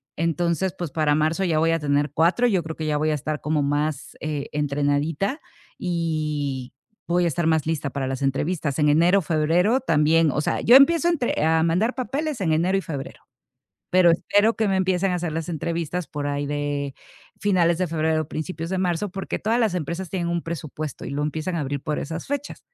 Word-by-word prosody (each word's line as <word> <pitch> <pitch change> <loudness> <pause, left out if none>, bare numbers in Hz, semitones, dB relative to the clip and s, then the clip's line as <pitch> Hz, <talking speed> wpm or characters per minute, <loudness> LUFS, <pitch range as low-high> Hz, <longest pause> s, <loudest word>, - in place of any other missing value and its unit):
entonces, 170 +2 0
pues, 175 -4 -4
para 155 0 +2
marzo, 155 +5 +1
ya 165 -4 +1
voy 165 +1 +3
a 165 - +1
tener 145 -1 0
4. 170 +11 +3
Yo 190 -7 +1
creo 160 +1 -6
que 155 - -4
ya 150 -1 0
voy 155 +1 +1
a - - +1
estar 150 +1 -4
como 150 0 0
más, 145 0 -2
eh, 150 -2 -3
entrenadita, 145 - 0 0.4
y 150 -7 -2 0.3
voy 175 +1 +2
a - - +3
estar 170 +1 0
más 160 -2 +2
lista 155 -3 -1
para 135 -1 -3
las 135 0 -3
entrevistas. 145 +2 -1
En 150 - +4
enero 170 +6 +4
o - - -2
febrero 170 - +2
también, 160 - +3
o - - -1
sea, - - -1
yo 240 - +6
empiezo 335 +5 +5
entre 265 - 0
a 160 0 +3
mandar 180 +9 +1
papeles 280 +2 -3
en 170 -4 +1
enero 175 +5 +2
y 195 - -1
febrero, 145 -5 -6 0.7
pero 180 -1 +6
espero 205 +6 +2
que 220 - +1
me 195 -1 +1
empiecen 185 0 +1
a - - 0
hacer 175 -2 -2
las 165 -1 -3
entrevistas 170 +1 -3
por 145 -1 -5
ahí 145 0 -2
de 145 -1 -2 0.4
finales 175 -4 +2
de 185 - +1
febrero, 160 0 0
o - - -12
principios 165 +1 -5
de 190 - 0
marzo, 180 +2 0
porque 195 0 -4
todas 225 +3 0
las 220 -6 +1
empresas 170 +2 -4
tienen 175 -3 -2
un 170 0 -1
presupuesto, 155 -3 -6
y - - -5
lo 140 +1 -2
empiezan 155 +4 -2
a - - -1
abrir 145 -1 -2
por 155 -2 -2
esas 160 +3 -5
fechas. 285 0 -4
165 Hz, 210 wpm, -23 LUFS, 150-180 Hz, 0.7 s, yo